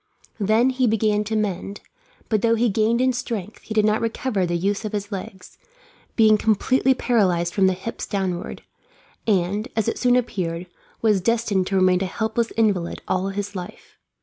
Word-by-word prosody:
Then 220 Hz, +5 st, +3 dB
he 255 Hz, -1 st, +1 dB
began 215 Hz, -1 st, +2 dB
to 220 Hz, +1 st, -2 dB
mend, 200 Hz, -1 st, -2 dB, 0.5 s
but 215 Hz, -3 st, +1 dB
though 230 Hz, 0 st, +3 dB
he 235 Hz, +1 st, +2 dB
gained 220 Hz, +4 st, +1 dB
in 255 Hz, 0 st, +3 dB
strength 220 Hz, -4 st, -5 dB
he 220 Hz, -, -7 dB
did 215 Hz, -1 st, +4 dB
not 215 Hz, 0 st, +2 dB
recover 225 Hz, -4 st, -1 dB
the 175 Hz, 0 st, 0 dB
use 200 Hz, +5 st, -1 dB
of 215 Hz, 0 st, -5 dB
his 205 Hz, 0 st, -3 dB
legs, 190 Hz, -1 st, -8 dB, 0.6 s
being 215 Hz, -2 st, +5 dB
completely 255 Hz, +5 st, +2 dB
paralysed 185 Hz, -9 st, +1 dB
from 195 Hz, -2 st, +3 dB
the 190 Hz, -, +2 dB
hips 190 Hz, +5 st, -6 dB
downward; 190 Hz, -4 st, -3 dB, 0.6 s
and, 200 Hz, +2 st, +1 dB
as 220 Hz, -2 st, 0 dB
it -, -, -1 dB
soon 245 Hz, -1 st, +3 dB
appeared, 180 Hz, -8 st, -2 dB, 0.4 s
was 210 Hz, -4 st, +3 dB
destined 220 Hz, -3 st, +1 dB
to 195 Hz, -, -1 dB
remain 185 Hz, -1 st, +3 dB
a -, -, +1 dB
helpless 220 Hz, +3 st, -1 dB
invalid 200 Hz, -6 st, 0 dB
all 185 Hz, +1 st, 0 dB
his 200 Hz, +1 st, -4 dB
life. 180 Hz, -1 st, -9 dB
210 Hz, 175 wpm, -23 LUFS, 190-225 Hz, 0.6 s, being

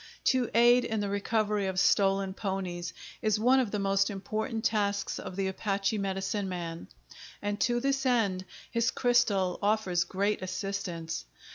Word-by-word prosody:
To 255 Hz, -2 st, +2 dB
aid 240 Hz, +1 st, +6 dB
in 220 Hz, -1 st, -2 dB
the 205 Hz, -1 st, -1 dB
recovery 210 Hz, 0 st, 0 dB
of 190 Hz, -1 st, -1 dB
stolen 195 Hz, -1 st, +3 dB
ponies 190 Hz, -4 st, -3 dB, 0.3 s
is 215 Hz, -1 st, +1 dB
one 255 Hz, +4 st, +5 dB
of 250 Hz, -5 st, +1 dB
the 210 Hz, -, -2 dB
most 195 Hz, 0 st, +2 dB
important 215 Hz, +3 st, -3 dB
tasks 205 Hz, -3 st, 0 dB
of 185 Hz, -, -7 dB
the 195 Hz, 0 st, 0 dB
Apache 195 Hz, +2 st, -1 dB
medicine 195 Hz, +1 st, -2 dB
man, 170 Hz, -, -5 dB, 0.5 s
and 205 Hz, 0 st, -3 dB
to 240 Hz, -1 st, +2 dB
this 275 Hz, +1 st, 0 dB
end 210 Hz, -8 st, +1 dB, 0.3 s
his 230 Hz, 0 st, +2 dB
crystal 215 Hz, -7 st, +2 dB
offers 200 Hz, -4 st, +2 dB
great 200 Hz, +4 st, -1 dB
assistance. 185 Hz, -4 st, -4 dB
200 Hz, 150 wpm, -29 LUFS, 190-220 Hz, 0.5 s, aid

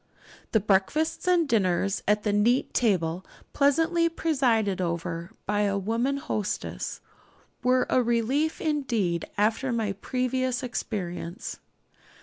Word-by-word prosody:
The 220 Hz, -, +4 dB
breakfasts 210 Hz, -, +1 dB
and 350 Hz, -3 st, +4 dB
dinners 195 Hz, -4 st, +1 dB
at 210 Hz, 0 st, +2 dB
the 210 Hz, -, +1 dB
neat 230 Hz, +5 st, +2 dB
table, 185 Hz, -6 st, +1 dB, 0.3 s
pleasantly 325 Hz, +4 st, +3 dB
presided 245 Hz, -, +1 dB
over 170 Hz, 0 st, -3 dB, 0.2 s
by 205 Hz, +1 st, +1 dB
a 200 Hz, -1 st, +1 dB
womanly 235 Hz, +8 st, -1 dB
hostess, 215 Hz, -9 st, -3 dB, 0.6 s
were 255 Hz, 0 st, +3 dB
a 255 Hz, -, +3 dB
relief 245 Hz, +7 st, +1 dB
indeed 235 Hz, -, 0 dB
after 220 Hz, +5 st, +1 dB
my 225 Hz, -3 st, 0 dB
previous 255 Hz, +4 st, -1 dB
experience. 180 Hz, -7 st, -4 dB
225 Hz, 115 wpm, -27 LUFS, 195-265 Hz, 0.6 s, The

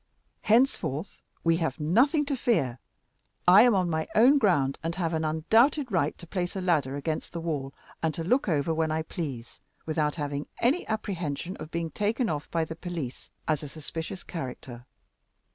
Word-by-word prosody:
Henceforth 215 Hz, -, +1 dB, 0.2 s
we 165 Hz, 0 st, +3 dB
have 160 Hz, -5 st, -2 dB
nothing 255 Hz, -, +3 dB
to 280 Hz, -1 st, -1 dB
fear. 135 Hz, -, +1 dB, 0.7 s
I 185 Hz, +4 st, +9 dB
am 240 Hz, -2 st, +5 dB
on 185 Hz, -2 st, +2 dB
my 160 Hz, -1 st, -1 dB
own 260 Hz, +6 st, +6 dB
ground, 145 Hz, -, +2 dB
and 165 Hz, +2 st, -3 dB
have 170 Hz, -3 st, -1 dB
an 160 Hz, 0 st, 0 dB
undoubted 225 Hz, -, +3 dB
right 160 Hz, -6 st, +1 dB
to 175 Hz, -, -11 dB
place 175 Hz, +1 st, -3 dB
a -, -, -1 dB
ladder 155 Hz, -7 st, +1 dB
against 155 Hz, +2 st, -3 dB
the 170 Hz, -, -3 dB
wall, 150 Hz, -5 st, -3 dB, 0.3 s
and 160 Hz, -, +1 dB
to 165 Hz, -, -3 dB
look 245 Hz, +6 st, +2 dB
over 160 Hz, 0 st, +1 dB
when 160 Hz, 0 st, 0 dB
I 155 Hz, +1 st, -1 dB
please, 140 Hz, -9 st, -6 dB, 0.3 s
without 155 Hz, -2 st, 0 dB
having 145 Hz, -2 st, -3 dB
any 265 Hz, +9 st, +1 dB
apprehensions 180 Hz, -6 st, -3 dB
of 155 Hz, -, -8 dB
being 165 Hz, -1 st, -3 dB
taken 220 Hz, +4 st, 0 dB
off 150 Hz, -2 st, -3 dB
by 165 Hz, -1 st, 0 dB
the 160 Hz, -, -7 dB
police 165 Hz, -7 st, -6 dB, 0.2 s
as 155 Hz, -2 st, +1 dB
a 150 Hz, -, -7 dB
suspicious 160 Hz, +4 st, -6 dB
character. 125 Hz, -5 st, -7 dB
165 Hz, 180 wpm, -28 LUFS, 150-200 Hz, 0.7 s, I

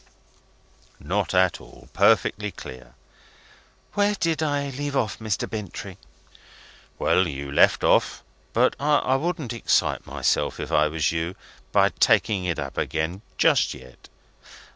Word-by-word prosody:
"Not -, -, -2 dB
at 90 Hz, -1 st, +2 dB
all. -, -, -16 dB
Perfectly 105 Hz, 0 st, +3 dB
clear." 65 Hz, -8 st, -11 dB, 1.0 s
"Where 205 Hz, 0 st, +2 dB
did 165 Hz, -4 st, -1 dB
I 145 Hz, -2 st, -1 dB
leave 145 Hz, +1 st, -4 dB
off, 120 Hz, -6 st, -1 dB
Mr. 110 Hz, -3 st, -2 dB
Bintrey?" 105 Hz, -5 st, -7 dB, 1.0 s
"Well, 90 Hz, -1 st, +2 dB
you 70 Hz, -2 st, -6 dB
left 70 Hz, -, +4 dB
off -, -, +2 dB, 0.3 s
but -, -, +2 dB
I 145 Hz, -2 st, +2 dB
wouldn't 155 Hz, -5 st, -3 dB
excite 115 Hz, -, 0 dB
myself, -, -, 0 dB
if -, -, -5 dB
I 75 Hz, 0 st, +4 dB
was 75 Hz, -1 st, 0 dB
you, 85 Hz, +2 st, -3 dB, 0.4 s
by -, -, +4 dB
taking 100 Hz, -4 st, +2 dB
it 85 Hz, -2 st, -1 dB
up 70 Hz, -2 st, -4 dB
again 80 Hz, +4 st, -2 dB, 0.2 s
just -, -, +3 dB
yet." 65 Hz, 0 st, -15 dB
105 Hz, 130 wpm, -24 LUFS, -, 1.0 s, left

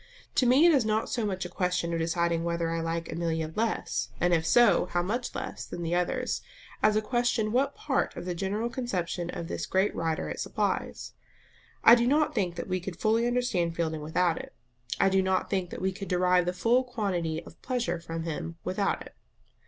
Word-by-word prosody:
To 255 Hz, -, +3 dB
me 265 Hz, +7 st, +6 dB
it 340 Hz, -, +7 dB
is 270 Hz, -5 st, +4 dB
not 215 Hz, 0 st, 0 dB
so 230 Hz, -3 st, -1 dB
much 190 Hz, -2 st, -3 dB
a -, -, -2 dB
question 180 Hz, -1 st, -1 dB
of 165 Hz, -, 0 dB
deciding 170 Hz, 0 st, 0 dB
whether 170 Hz, -1 st, -1 dB
I 165 Hz, 0 st, -1 dB
like 165 Hz, 0 st, -3 dB
Amelia 160 Hz, -1 st, -2 dB
less, 225 Hz, +1 st, -1 dB
and 175 Hz, 0 st, +3 dB
if 165 Hz, -1 st, +2 dB
so, 240 Hz, -6 st, +5 dB
how 175 Hz, 0 st, 0 dB
much 235 Hz, +7 st, -3 dB
less, -, -, -5 dB
than 175 Hz, -, -6 dB
the 165 Hz, +1 st, -1 dB
others, 175 Hz, 0 st, 0 dB, 0.4 s
as 215 Hz, 0 st, +4 dB
a 215 Hz, -, +2 dB
question 240 Hz, -2 st, +1 dB
what 275 Hz, +4 st, +1 dB
part 275 Hz, -3 st, -1 dB
of -, -, -6 dB
the 180 Hz, -, -2 dB
general 200 Hz, +6 st, -1 dB
conception 180 Hz, -8 st, -2 dB
of 170 Hz, -, -5 dB
this -, -, -4 dB
great 190 Hz, +2 st, +2 dB
writer 165 Hz, -1 st, -1 dB
it -, -, -5 dB
supplies? -, -, -2 dB, 0.7 s
I 230 Hz, -, +10 dB
do 240 Hz, 0 st, +5 dB
not 300 Hz, +3 st, +3 dB
think 185 Hz, -6 st, 0 dB
that 170 Hz, -, -5 dB
we 185 Hz, 0 st, -1 dB
could 180 Hz, -1 st, -7 dB
fully 225 Hz, +2 st, +2 dB
understand 220 Hz, -9 st, 0 dB
Fielding 160 Hz, -2 st, -1 dB
without 165 Hz, +2 st, +1 dB
it; -, -, -10 dB, 0.4 s
I -, -, +5 dB
do 190 Hz, 0 st, +3 dB
not 190 Hz, 0 st, 0 dB
think 190 Hz, -3 st, 0 dB
that -, -, -7 dB
we 190 Hz, -, +2 dB
could 195 Hz, +1 st, -7 dB
derive 180 Hz, -1 st, +3 dB
the 180 Hz, -, +1 dB
full 235 Hz, +7 st, +3 dB
quantity 180 Hz, -10 st, -2 dB
of -, -, -15 dB
pleasure 240 Hz, -9 st, -1 dB
from 165 Hz, -1 st, -5 dB
him 165 Hz, 0 st, -4 dB
without 195 Hz, +2 st, -1 dB
it. -, -, -14 dB
180 Hz, 210 wpm, -28 LUFS, 170-225 Hz, 0.7 s, I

